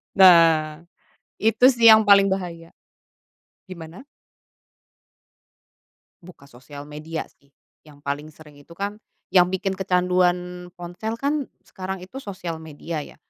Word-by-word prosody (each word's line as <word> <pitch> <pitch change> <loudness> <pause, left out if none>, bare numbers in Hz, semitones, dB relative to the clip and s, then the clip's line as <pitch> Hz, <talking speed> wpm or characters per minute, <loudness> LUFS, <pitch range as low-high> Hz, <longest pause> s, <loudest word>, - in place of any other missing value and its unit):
Nah, 165 -4 +5 0.6
itu 225 +4 +4
sih 235 -3 +7
yang 220 - +7
paling 195 -1 +6
bahaya. 170 -3 -6 1.0
Gimana? 170 +1 -10 2.2
Buka 155 -5 -16
sosial 140 +4 -12
media 150 +2 -6
sih, 140 - -32 0.4
yang 145 -1 -18
paling 145 +1 -4
sering 150 -2 -17
itu 145 +4 -16
kan, 200 +3 -5 0.3
yang 180 -2 +5
bikin 190 0 -3
kecanduan 180 -1 0
ponsel 180 +6 -6
kan 280 +3 -2 0.2
sekarang 190 0 -7
itu 255 +9 -10
sosial 185 -8 -7
media 160 +1 -7
ya. - - -16
180 Hz, 115 wpm, -22 LUFS, 160-195 Hz, 2.2 s, sih